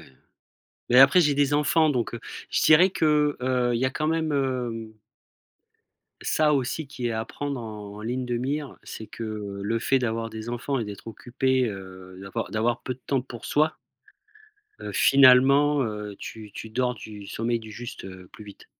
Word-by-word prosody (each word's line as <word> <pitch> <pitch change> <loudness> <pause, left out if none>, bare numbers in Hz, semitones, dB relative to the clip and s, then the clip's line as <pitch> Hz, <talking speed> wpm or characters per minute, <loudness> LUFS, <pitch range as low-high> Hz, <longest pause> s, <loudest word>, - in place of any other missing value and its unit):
heu, 65 - -20 0.8
mais 125 - +6
après 135 +7 +8
j'ai 150 -3 +3
des 145 0 +2
enfants 155 +2 +3
donc 120 -5 -1
heu, 115 - -6 0.3
je - - +1
dirais 175 +5 +6
que, 150 -4 +2
heu, 125 -1 +1
il 115 - +1
y 130 - +1
a 130 - +2
quand 155 +3 -2
même, 160 -1 0
hem 125 -5 -2 1.3
ça 150 -1 +2
aussi 140 +3 -2
qui 125 -3 -4
est 115 - -2
à 110 0 -2
prendre 140 0 -5
en 105 -3 -8
en 105 - -9
ligne 125 +3 -2
de 120 -1 -2
mire. 140 +3 -3
C'est 110 - -8
que, 105 -3 -6
le 115 +3 0
fait 135 +3 +2
d'avoir 115 -2 -2
des 110 +1 -7
enfants 125 +3 -2
et 115 - -2
d'être 105 +1 -9
occupé, 130 +3 0
heu, 95 -2 -9
d'avoir 100 +4 -5
d'avoir 115 +2 0
peu 130 - -3
de 125 - -24
temps 135 -3 +1
pour 120 -3 -10
soi 155 +2 +1 1.0
heu, - - -5
finalement, 140 +2 +6
heu, 105 -2 -5
tu 110 -2 -9
tu 110 - -8
dors 125 +2 0
du 105 -3 -10
sommeil 115 +2 -2
du 110 -1 -11
juste, 120 +2 -8
heu, 95 -1 -10
plus 105 - -12
vite. 100 -1 -13
120 Hz, 190 wpm, -25 LUFS, 110-140 Hz, 1.3 s, après